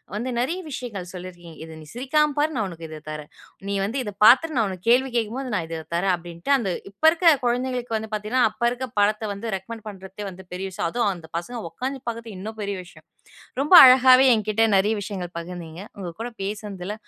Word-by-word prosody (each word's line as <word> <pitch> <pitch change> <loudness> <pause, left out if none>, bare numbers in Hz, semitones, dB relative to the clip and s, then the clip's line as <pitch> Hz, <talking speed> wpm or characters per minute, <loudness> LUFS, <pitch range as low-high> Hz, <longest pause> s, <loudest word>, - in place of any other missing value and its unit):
வந்து 235 +5 -3
நெறைய 325 +10 -1
விஷயங்கள் 210 -9 -6
சொல்லி 185 0 -7
இருக்கீங்க. 170 -2 -14
"இத 160 -1 -11
நீ 155 - -13
சிரிக்காம 295 +4 +1
பாரு 305 +2 +2
நான் 215 -4 -1
உனக்கு 165 -1 -9
இத 155 -1 -8
தரேன். 150 -1 -7 0.4
நீ 200 - -1
வந்து 230 +7 -3
இத 205 - -5
பாத்துட்டு 305 +7 +6
நான் 220 -3 +2
உனக்கு 185 +3 -9
கேள்வி 255 +2 +4
கேக்கும் 225 +2 -2
போது 255 -5 -5
நான் 165 -3 -2
இத 165 -1 -4
தரேன்" 185 +2 +2
அப்டின்ட்டு 170 +8 -3
அந்த 210 -7 -2 0.2
இப்ப 200 - -40
இருக்க 335 -1 +5
குழந்தைங்களுக்கு 245 -1 -1
வந்து 220 0 -7
பாத்தீங்கன்னா 215 +4 0
அப்ப 240 - -8
இருக்க 255 +1 -4 0.2
படத்த 210 +2 +2
வந்து 215 +1 -5
ரெகமெண்ட் 220 +3 -10
பண்றத்தே 195 0 -8 0.2
பெரிய 185 +2 -4
விஷயம். 170 - -2
அதுவும் 225 0 0
அந்த 165 -2 -12
பசங்க 240 +8 -5
ஒக்காந்து 260 - -4
பாக்குற்து 230 -3 -5
இன்னும் 215 +3 -7
பெரிய 200 0 -2
விஷயம். 155 -2 -17 0.6
ரொம்ப 300 +6 +3
அழகாவே 255 0 +8
என்கிட்ட 215 0 0
நிறைய 205 +3 +2
விஷயங்கள் 185 -3 -6
பகிர்ந்தீங்க. 170 0 -8 0.2
உங்க 185 -3 -5
கூட 240 - -3
பேசுனதுல 205 -1 -5
210 Hz, 200 wpm, -24 LUFS, 180-245 Hz, 0.6 s, அழகாவே